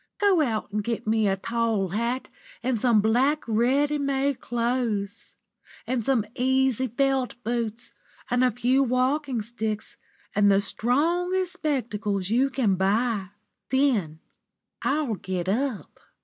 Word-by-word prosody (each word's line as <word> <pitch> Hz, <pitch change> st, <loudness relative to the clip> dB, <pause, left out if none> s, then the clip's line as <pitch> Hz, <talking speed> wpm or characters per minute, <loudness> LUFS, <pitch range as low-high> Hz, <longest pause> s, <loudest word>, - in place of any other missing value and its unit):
Go 395 Hz, -5 st, +4 dB
out 220 Hz, -7 st, -1 dB
and 210 Hz, 0 st, -1 dB
get 230 Hz, +1 st, -3 dB
me 220 Hz, -1 st, +2 dB
a 195 Hz, 0 st, +1 dB
tall 225 Hz, -2 st, 0 dB
hat 235 Hz, +7 st, -2 dB, 0.4 s
and 245 Hz, -4 st, 0 dB
some 235 Hz, -4 st, +4 dB
black, 260 Hz, +8 st, +2 dB
ready 270 Hz, +7 st, +2 dB
made 275 Hz, -1 st, 0 dB
clothes, 235 Hz, -4 st, -2 dB, 0.5 s
and 250 Hz, -2 st, -1 dB
some 240 Hz, -3 st, +1 dB
easy 260 Hz, 0 st, +1 dB
felt 265 Hz, +1 st, 0 dB
boots 235 Hz, 0 st, -3 dB, 0.4 s
and 245 Hz, +1 st, +3 dB
a 255 Hz, -, +5 dB
few 245 Hz, +3 st, +2 dB
walking 255 Hz, -1 st, 0 dB
sticks, 220 Hz, -1 st, -4 dB, 0.4 s
and 205 Hz, 0 st, +4 dB
the 195 Hz, 0 st, +5 dB
strongest 345 Hz, -, 0 dB
spectacles 215 Hz, -, -2 dB
you 260 Hz, +4 st, +3 dB
can 255 Hz, -7 st, +1 dB
buy. 200 Hz, +2 st, +1 dB, 0.4 s
Then 235 Hz, -, +1 dB, 0.6 s
I'll 285 Hz, -4 st, 0 dB
get 185 Hz, -3 st, -4 dB
up." 240 Hz, +3 st, -2 dB
240 Hz, 130 wpm, -25 LUFS, 215-270 Hz, 0.6 s, a